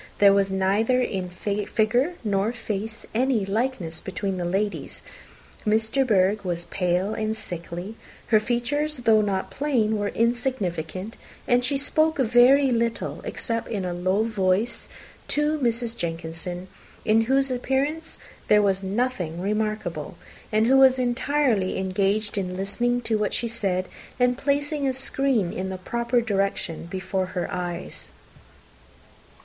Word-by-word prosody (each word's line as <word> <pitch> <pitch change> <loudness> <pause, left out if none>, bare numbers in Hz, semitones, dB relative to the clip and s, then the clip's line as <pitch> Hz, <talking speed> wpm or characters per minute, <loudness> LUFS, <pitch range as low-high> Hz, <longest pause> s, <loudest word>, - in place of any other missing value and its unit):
There 200 -1 +7
was 195 0 +2
neither 200 +6 +2
in 190 -7 -1
figure 215 - 0
nor 205 +1 +1
face 220 -1 -5
any 240 -3 +2
likeness 195 -6 -2
between 190 +1 -3
the 175 - -2
ladies. 200 +4 -2 0.6
Miss 220 +1 +2
de 270 +4 +2
Bourgh 205 -3 +3
was 175 -2 -2
pale 180 +3 0
and 220 0 -2
sickly: 180 +1 -7 0.3
her 215 - +6
features, 270 +7 -1
though 220 -1 +6
not 195 -2 -1
plain, 230 -7 +1
were 205 - 0
insignificant; 215 -6 -2 0.3
and 245 0 +3
she 275 +3 +1
spoke 310 +3 +2
very 260 +2 +5
little, 230 -1 -1
except 230 -1 -3
in 200 -5 -3
a 180 - -2
low 185 +4 +1
voice, 210 0 0 0.4
to 300 +1 +1
Mrs. 235 -2 0
Jenkinson, 170 -1 -4 0.4
in 225 +1 +4
whose 270 +2 +2
appearance 270 +6 -1 0.3
there 210 0 +5
was 195 -1 +1
nothing 195 -5 -2
remarkable, 215 +2 -2 0.3
and 215 +1 +3
who 265 +3 +5
was 265 -1 +6
entirely 250 -4 +1
engaged 200 +3 0
in 185 -1 -3
listening 240 +6 0
to 225 -2 0
what 210 - 0
she 235 - -1
said, 195 -5 -1 0.3
and 250 0 +3
placing 285 +1 0
a 260 - 0
screen 265 -7 0
in 190 +1 -3
the 190 - -4
proper 235 +5 0
direction 195 -6 -1
before 190 +1 -2
her 175 - 0
eyes. 175 -2 -5
215 Hz, 140 wpm, -25 LUFS, 190-245 Hz, 0.6 s, There